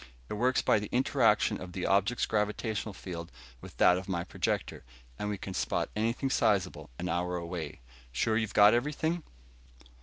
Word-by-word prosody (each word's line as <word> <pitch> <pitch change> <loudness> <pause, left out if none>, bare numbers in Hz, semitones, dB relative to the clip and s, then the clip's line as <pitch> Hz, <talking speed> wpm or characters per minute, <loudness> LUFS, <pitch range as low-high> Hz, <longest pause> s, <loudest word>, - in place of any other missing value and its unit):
It - - -3
works 125 +4 +2
by - - +4
the 105 - -6
interaction 125 -4 +2
of 90 -1 -8
the 90 - -3
object's 100 +5 +2
gravitational 105 0 -1
field 85 -3 -7 0.3
with - - -12
that 90 0 +5
of 95 +1 -10
my 85 -2 -1
projector, 85 - -2 0.4
and 105 - -2
we 105 - -2
can 95 0 -6
spot - - -1
anything 115 +5 0
sizable 105 -7 +1
an 90 - -3
hour 90 +1 -1
away. 85 -5 -5 0.3
Sure 110 - +1
you've 110 -1 -1
got 105 +1 +8
everything?" 150 +7 0
105 Hz, 170 wpm, -30 LUFS, 90-115 Hz, 0.4 s, got